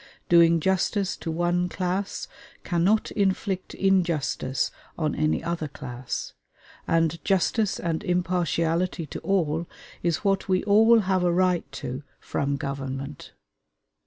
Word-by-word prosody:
Doing 170 Hz, -1 st, +6 dB
justice 190 Hz, +3 st, +1 dB
to -, -, -5 dB
one 175 Hz, +2 st, +1 dB
class 185 Hz, +2 st, -2 dB, 0.4 s
cannot 185 Hz, +5 st, +2 dB
inflict 190 Hz, -1 st, -1 dB
injustice 170 Hz, -8 st, +1 dB, 0.3 s
on 155 Hz, -2 st, 0 dB
any 155 Hz, +1 st, 0 dB
other 165 Hz, -2 st, -2 dB
class, 130 Hz, -3 st, -6 dB, 0.5 s
and 165 Hz, 0 st, +1 dB
"justice 195 Hz, +2 st, +1 dB
and 165 Hz, -2 st, -2 dB
impartiality 175 Hz, -1 st, 0 dB
to -, -, -7 dB
all" 170 Hz, -4 st, 0 dB, 0.3 s
is 170 Hz, +1 st, 0 dB
what 195 Hz, -1 st, +1 dB
we 185 Hz, -1 st, +2 dB
all 225 Hz, +3 st, +6 dB
have 190 Hz, -2 st, +1 dB
a 175 Hz, -, +3 dB
right 180 Hz, 0 st, +1 dB
to 130 Hz, 0 st, -5 dB, 0.2 s
from 140 Hz, 0 st, -1 dB
government. 140 Hz, 0 st, -5 dB
175 Hz, 120 wpm, -26 LUFS, 155-190 Hz, 0.5 s, Doing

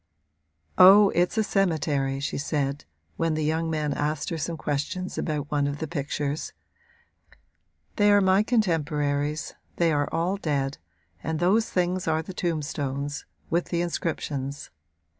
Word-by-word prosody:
'Oh, 200 Hz, +2 st, +9 dB
it's 175 Hz, +5 st, +1 dB
a 220 Hz, -, +4 dB
cemetery,' 155 Hz, -9 st, 0 dB
she 140 Hz, -, -3 dB
said, 145 Hz, -1 st, -2 dB, 0.3 s
when 165 Hz, -1 st, 0 dB
the 155 Hz, -, -1 dB
young 160 Hz, +2 st, 0 dB
man 150 Hz, -2 st, -1 dB
asked 150 Hz, +1 st, -2 dB
her 165 Hz, -, -2 dB
some 165 Hz, +2 st, -3 dB
question 150 Hz, +6 st, -2 dB
about 150 Hz, -3 st, -3 dB
one 145 Hz, -1 st, +1 dB
of 145 Hz, 0 st, -3 dB
the 160 Hz, -, -3 dB
pictures; 145 Hz, -1 st, -3 dB, 1.4 s
'they 205 Hz, -1 st, +5 dB
are 205 Hz, -, +6 dB
my 190 Hz, 0 st, +4 dB
contemporaries, 155 Hz, -, 0 dB, 0.2 s
they 170 Hz, -1 st, +2 dB
are 145 Hz, -1 st, +1 dB
all 180 Hz, +4 st, 0 dB
dead 140 Hz, -6 st, -2 dB, 0.4 s
and 160 Hz, +6 st, -2 dB
those 205 Hz, +6 st, +2 dB
things 180 Hz, 0 st, 0 dB
are 160 Hz, 0 st, +1 dB
the 190 Hz, -, -8 dB
tombstones, 145 Hz, -4 st, -3 dB, 0.3 s
with 170 Hz, +2 st, +1 dB
the 170 Hz, -1 st, -1 dB
inscriptions. 145 Hz, -5 st, -3 dB
155 Hz, 140 wpm, -26 LUFS, 145-175 Hz, 1.4 s, Oh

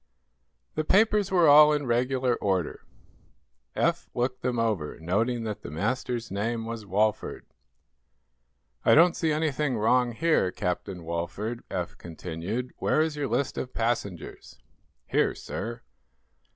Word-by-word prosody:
The 155 Hz, -, -1 dB
papers 205 Hz, +2 st, +3 dB
were 175 Hz, -4 st, +4 dB
all 150 Hz, +1 st, +8 dB
in 145 Hz, -1 st, -1 dB
regular 125 Hz, +1 st, +1 dB
order. 95 Hz, -5 st, -1 dB, 0.9 s
Eph -, -, 0 dB
looked 125 Hz, +1 st, -1 dB
them 125 Hz, -1 st, -1 dB
over, 105 Hz, -10 st, -1 dB
noting 115 Hz, +8 st, 0 dB
that 110 Hz, -2 st, -4 dB
the -, -, -8 dB
master's 115 Hz, -, -2 dB
name 110 Hz, +3 st, -2 dB
was 115 Hz, -2 st, -6 dB
Walford. 105 Hz, +2 st, 0 dB, 1.4 s
"I -, -, +6 dB
don't 170 Hz, +2 st, +6 dB
see 160 Hz, -2 st, 0 dB
anything 150 Hz, -4 st, 0 dB
wrong 120 Hz, +3 st, +2 dB
here, 155 Hz, -, +2 dB
Captain 90 Hz, 0 st, -3 dB
Walford," 85 Hz, +8 st, -4 dB
Eph -, -, -4 dB
continued. 85 Hz, +9 st, -5 dB
"Where -, -, +1 dB
is 155 Hz, -1 st, +1 dB
your 145 Hz, -2 st, -2 dB
list 125 Hz, +4 st, -1 dB
of 130 Hz, -, -6 dB
passengers?" 110 Hz, -7 st, -3 dB, 0.5 s
"Here, -, -, +1 dB
sir." 115 Hz, +1 st, -6 dB
120 Hz, 130 wpm, -27 LUFS, 100-140 Hz, 1.4 s, all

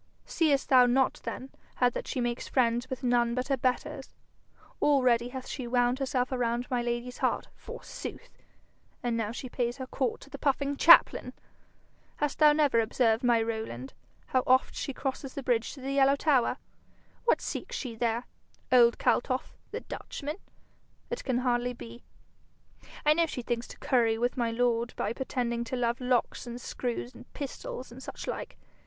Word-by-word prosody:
'Seest 295 Hz, -5 st, +1 dB
thou 255 Hz, -3 st, +7 dB
not 260 Hz, +2 st, +2 dB
then 265 Hz, -, -5 dB, 0.2 s
how 250 Hz, -, +4 dB
that 245 Hz, -, -3 dB
she -, -, -2 dB
makes 240 Hz, -1 st, -2 dB
friends 240 Hz, 0 st, +1 dB
with 260 Hz, 0 st, -5 dB
none 240 Hz, -1 st, +2 dB
but 255 Hz, +2 st, -2 dB
her 275 Hz, -, +3 dB
betters? 255 Hz, 0 st, -2 dB, 0.7 s
Already 250 Hz, -4 st, +3 dB
hath 260 Hz, 0 st, -7 dB
she 255 Hz, -4 st, -5 dB
wound 245 Hz, +1 st, +2 dB
herself 255 Hz, -1 st, 0 dB
around 240 Hz, -1 st, -1 dB
my 245 Hz, -1 st, +1 dB
lady's 240 Hz, +1 st, -3 dB
heart, -, -, 0 dB
forsooth! -, -, -9 dB, 0.7 s
and 240 Hz, -1 st, 0 dB
now 220 Hz, -2 st, -1 dB
she 255 Hz, +2 st, -6 dB
pays 240 Hz, 0 st, -2 dB
her 260 Hz, -, -5 dB
court 255 Hz, -2 st, -2 dB
to -, -, -13 dB
the 280 Hz, -, -7 dB
puffing 280 Hz, 0 st, +1 dB
chaplain! 335 Hz, +4 st, +6 dB, 0.8 s
Hast 295 Hz, -1 st, -2 dB
thou 305 Hz, -1 st, +8 dB
never 295 Hz, -5 st, +3 dB
observed, 225 Hz, +1 st, +2 dB
my 235 Hz, -2 st, +4 dB
Rowland, 220 Hz, -, -4 dB, 0.3 s
how 255 Hz, -, +1 dB
oft 260 Hz, +1 st, +4 dB
she -, -, -3 dB
crosses 270 Hz, 0 st, -4 dB
the 275 Hz, -, -4 dB
bridge 240 Hz, -2 st, +1 dB
to 270 Hz, -, -11 dB
the 270 Hz, +1 st, -3 dB
yellow 275 Hz, 0 st, +5 dB
tower? 275 Hz, -4 st, +2 dB, 0.7 s
What 475 Hz, -, +4 dB
seeks -, -, -5 dB
she 250 Hz, -, -4 dB
there? 235 Hz, +1 st, 0 dB, 0.5 s
Old 240 Hz, -2 st, +6 dB
Kaltoff, 255 Hz, +1 st, 0 dB
the -, -, -5 dB
Dutchman, 300 Hz, +3 st, -6 dB, 0.7 s
it 480 Hz, +1 st, -3 dB
can 255 Hz, -3 st, 0 dB
hardly 245 Hz, -1 st, +1 dB
be. 235 Hz, 0 st, -10 dB, 1.0 s
I 300 Hz, -, +7 dB
know 335 Hz, +1 st, +2 dB
she 250 Hz, -5 st, -5 dB
thinks 240 Hz, 0 st, -2 dB
to -, -, -11 dB
curry 230 Hz, -4 st, +2 dB
with 245 Hz, +2 st, 0 dB
my 235 Hz, -2 st, 0 dB
lord 235 Hz, 0 st, 0 dB
by 210 Hz, -, -1 dB
pretending 235 Hz, -2 st, -2 dB
to 235 Hz, -, -3 dB
love 240 Hz, 0 st, 0 dB
locks 250 Hz, 0 st, 0 dB
and 240 Hz, 0 st, -6 dB
screws 245 Hz, 0 st, -4 dB
and -, -, -14 dB
pistols 260 Hz, -2 st, -6 dB
and 250 Hz, +2 st, -11 dB
such -, -, -7 dB
like. -, -, -5 dB
250 Hz, 175 wpm, -29 LUFS, 235-265 Hz, 1.0 s, thou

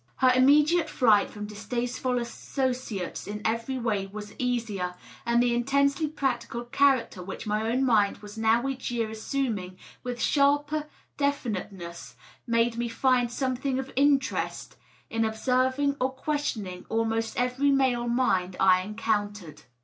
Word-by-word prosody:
Here 255 Hz, -, +6 dB
immediate 295 Hz, +6 st, +4 dB
flight 215 Hz, -5 st, +4 dB
from 210 Hz, 0 st, -7 dB
distasteful 240 Hz, +4 st, -2 dB
associates 245 Hz, -4 st, -3 dB
in 210 Hz, +1 st, -4 dB
every 230 Hz, +4 st, -1 dB
way 215 Hz, -5 st, -1 dB
was 210 Hz, +1 st, -8 dB
easier, 225 Hz, -8 st, -1 dB, 0.3 s
and 235 Hz, +1 st, +4 dB
the 240 Hz, -1 st, +2 dB
intensely 280 Hz, +5 st, +2 dB
practical 250 Hz, -5 st, -2 dB
character 255 Hz, -6 st, +2 dB
which 190 Hz, +5 st, -7 dB
my 215 Hz, +1 st, 0 dB
own 255 Hz, +3 st, +1 dB
mind 210 Hz, -5 st, +3 dB
was 205 Hz, 0 st, -11 dB
now 225 Hz, +3 st, +2 dB
each 265 Hz, -1 st, -3 dB
year 230 Hz, -2 st, -1 dB
assuming 220 Hz, -5 st, -3 dB, 0.2 s
with 245 Hz, -1 st, -5 dB
sharper 290 Hz, +3 st, +2 dB, 0.3 s
definiteness 205 Hz, -11 st, -3 dB, 0.3 s
made 230 Hz, 0 st, +2 dB
me 235 Hz, 0 st, -1 dB
find 250 Hz, 0 st, +2 dB
something 260 Hz, +1 st, -1 dB
of 265 Hz, 0 st, -5 dB
interest 280 Hz, +1 st, +1 dB, 0.4 s
in 225 Hz, 0 st, +1 dB
ob 220 Hz, 0 st, -1 dB
serving 260 Hz, +4 st, +1 dB
or 255 Hz, -, +2 dB
questioning 260 Hz, -, -3 dB
almost 225 Hz, 0 st, -1 dB
every 250 Hz, +3 st, +1 dB
male 260 Hz, -3 st, +2 dB
mind 190 Hz, -7 st, +1 dB
I 185 Hz, -1 st, +5 dB
encountered. 205 Hz, -5 st, -3 dB
240 Hz, 135 wpm, -27 LUFS, 215-265 Hz, 0.4 s, Here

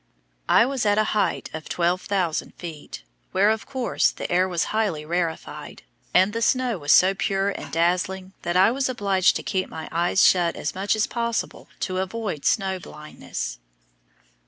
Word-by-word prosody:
I -, -, +6 dB
was 265 Hz, -1 st, -2 dB
at 205 Hz, -1 st, +2 dB
a 215 Hz, -, +4 dB
height 210 Hz, -, 0 dB
of 160 Hz, 0 st, -7 dB
12,000 180 Hz, 0 st, -1 dB
feet, 155 Hz, -, -9 dB, 0.3 s
where, 205 Hz, +3 st, +4 dB
of 220 Hz, 0 st, -3 dB
course, 260 Hz, -3 st, +1 dB
the -, -, -6 dB
air 185 Hz, +1 st, +3 dB
was 175 Hz, -2 st, 0 dB
highly 200 Hz, -9 st, 0 dB
rarefied, 170 Hz, 0 st, -4 dB, 0.3 s
and 190 Hz, +3 st, +4 dB
the 230 Hz, -, -2 dB
snow 245 Hz, -3 st, +1 dB
was 145 Hz, -1 st, 0 dB
so 190 Hz, +1 st, +6 dB
pure 195 Hz, 0 st, 0 dB
and -, -, -7 dB
dazzling 185 Hz, +3 st, 0 dB
that 175 Hz, +1 st, -1 dB
I 190 Hz, +4 st, +6 dB
was 260 Hz, +1 st, -1 dB
obliged 200 Hz, -6 st, +2 dB
to -, -, -3 dB
keep 190 Hz, -1 st, -2 dB
my 160 Hz, -, -7 dB
eyes 175 Hz, +3 st, +3 dB
shut 175 Hz, -2 st, +3 dB
as 150 Hz, -, -3 dB
much 195 Hz, +3 st, 0 dB
as 215 Hz, -, +2 dB
possible 235 Hz, -1 st, -3 dB
to 185 Hz, -2 st, -1 dB
avoid 190 Hz, -5 st, -4 dB
snow 190 Hz, -2 st, +1 dB
blindness. 150 Hz, -, -7 dB
190 Hz, 170 wpm, -24 LUFS, 170-215 Hz, 0.3 s, I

